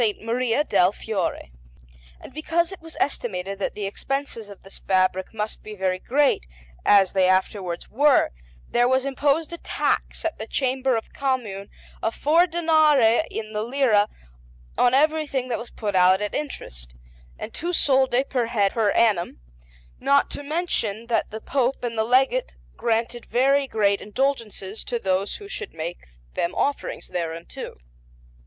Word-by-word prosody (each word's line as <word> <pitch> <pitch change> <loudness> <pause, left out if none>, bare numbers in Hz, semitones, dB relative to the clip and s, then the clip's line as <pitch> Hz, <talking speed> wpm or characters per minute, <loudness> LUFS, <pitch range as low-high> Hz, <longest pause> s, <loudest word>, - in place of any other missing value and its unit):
Maria 240 +4 0
del 180 -10 +3
Fiore. 195 - -3 0.7
And - - -12
because 330 +3 0
it 385 - -9
was 325 0 -9
estimated 195 -8 -2
that - - -2
the 210 - -3
expenses 235 +1 -4
of 200 - -13
this 195 - -10
fabric 185 0 +1
must 215 -1 -4
be 215 0 -9
very 185 -1 -1
great, 275 - +1 0.4
as 195 -2 +5
they 185 -1 +3
afterwards 185 -2 0
were, 285 +4 +3 0.4
there 240 0 +3
was 260 +1 +2
imposed 285 +4 0
a 340 - -6
tax - - -1
at 330 - -2
the 220 - -5
Chamber 260 -1 0
of 225 - -4
the - - -27
Commune 235 -8 -2 0.3
of 225 - -1
four 330 +5 +4
danari 315 -7 +4
in 215 -1 -6
the 210 - -1
lira 230 -4 +2 0.7
on 250 +1 +4
everything 290 -3 +1
that 235 - -1
was 235 - -8
put 210 -2 -4
out 185 0 +5
at 210 0 -3
interest, - - -6 0.4
and - - -7
two 345 +3 -3
soldi 265 -5 +3
per 250 -4 -1
head 205 -4 +2
per 220 -3 +1
annum; 200 - +2 0.6
not 280 0 +3
to - - -5
mention 280 - -1
that 230 - +1
the 220 - -6
Pope 260 -1 0
and 235 -1 -2
the 220 - +1
Legate 265 - +2 0.2
granted 230 +1 -1
very 275 +3 +3
great 200 -4 +1
indulgences 220 -4 -2
to 240 - -2
those 195 -2 -1
who 405 - -9
should 395 - -7
make 165 +2 -6 0.3
them 170 +2 -1
offerings 285 - -2
thereunto. 165 -1 -5
235 Hz, 160 wpm, -24 LUFS, 200-275 Hz, 0.7 s, as